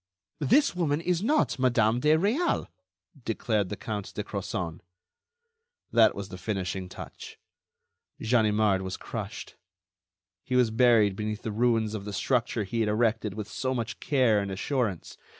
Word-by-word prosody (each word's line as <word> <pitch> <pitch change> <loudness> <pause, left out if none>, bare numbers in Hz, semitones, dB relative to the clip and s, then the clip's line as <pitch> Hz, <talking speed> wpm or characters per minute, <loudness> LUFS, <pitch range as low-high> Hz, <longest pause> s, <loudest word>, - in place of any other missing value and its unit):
"This 280 - +3
woman 155 -4 +1
is 175 +1 0
not 270 - +1
Madame 120 -3 +3
de 150 +4 +4
Réal," 230 - +1 0.6
declared 110 -3 -1
the 105 - -5
Count 105 -2 -5
de 105 - -2
Crozon. 95 -5 -4 1.1
That 115 -1 +5
was 100 -1 -6
the 90 0 -8
finishing 95 -2 -3
touch. - - -10 0.8
Ganimard 110 -4 +2
was 95 0 -4
crushed. - - -7 0.9
He 125 - -2
was 125 -3 +4
buried 115 -4 +4
beneath 105 +1 -4
the 110 - -3
ruins 115 -1 +1
of 105 -2 -5
the 105 - -5
structure 120 +1 0
he 115 +4 -3
had 110 -2 +2
erected 110 -2 +1
with 105 -1 -5
so 130 +3 -2
much 120 -1 -4
care 125 -7 +3
and 100 -1 -3
assurance. 105 - -2
110 Hz, 150 wpm, -28 LUFS, 105-125 Hz, 1.1 s, That